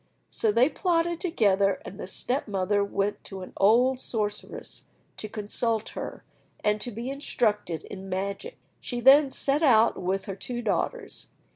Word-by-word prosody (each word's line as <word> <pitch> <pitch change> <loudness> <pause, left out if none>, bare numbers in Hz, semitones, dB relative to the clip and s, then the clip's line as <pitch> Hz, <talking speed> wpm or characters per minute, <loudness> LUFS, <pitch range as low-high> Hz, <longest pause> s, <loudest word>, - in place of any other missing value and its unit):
So 220 - +1
they 235 +5 +5
plotted 340 0 0
together, 200 - +2
and 195 - -9
the - - -5
step 250 +8 -1
mother 200 0 +1
went 200 0 -2
to 190 -2 -7
an - - -11
old 245 +6 +4
sorceress 210 -5 -4 0.3
to 215 - -6
consult 220 +1 -1
her, - - -7 0.4
and 210 0 +1
to - - -2
be 235 +4 -5
instructed 210 - -1
in 195 -1 -9
magic. 200 - -4 0.2
She 245 - -4
then 270 +3 +7
set 275 +2 0
out 230 -9 +4
with 190 +2 -1
her 195 - -5
two 240 +4 -5
daughters. 460 - -2
220 Hz, 155 wpm, -27 LUFS, 200-265 Hz, 0.4 s, then